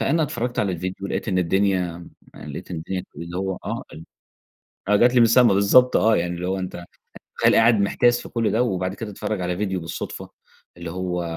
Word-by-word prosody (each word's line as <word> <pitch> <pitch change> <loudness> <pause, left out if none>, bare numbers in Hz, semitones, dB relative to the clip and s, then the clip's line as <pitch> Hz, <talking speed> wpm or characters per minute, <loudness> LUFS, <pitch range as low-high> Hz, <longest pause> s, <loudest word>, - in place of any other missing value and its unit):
فأنا 160 +3 +1
اتفرّجت 120 -3 -3
على 100 -3 +1
الفيديو 95 +3 -5
لقيت - - -3
إن 90 -2 +1
الدنيا 90 -1 0
م 85 - -12 0.3
لقيت 75 +5 -8
إن 85 - -4
الدنيا 90 +3 -4
اللي 85 +3 -7
هو 95 -1 -3
آه - - -4
ال 80 +1 -10 0.8
آه 105 - +5
جت 120 +3 +4
لي 120 - +5
من 115 - +7
السما 115 -2 +5
بالضبط 125 +6 +5
آه، 110 0 +4
يعني 85 +1 -1
اللي 90 +1 -4
هو 95 +1 -1
أنت 90 -1 -6 0.5
تخيّل - - +4
قاعد 115 -2 +5
محتاس 120 +4 +2
في - - -10
كل 115 -2 -1
ده 115 - +2
وبعد 95 -5 -2
كده 110 -2 -7
تتفرّج 100 0 -4
على 90 0 -2
فيديو 95 -2 -2
بالصدفة، 80 - -6 0.5
اللي 85 -1 -7
هو 90 0 -3
95 Hz, 210 wpm, -23 LUFS, 90-115 Hz, 0.8 s, من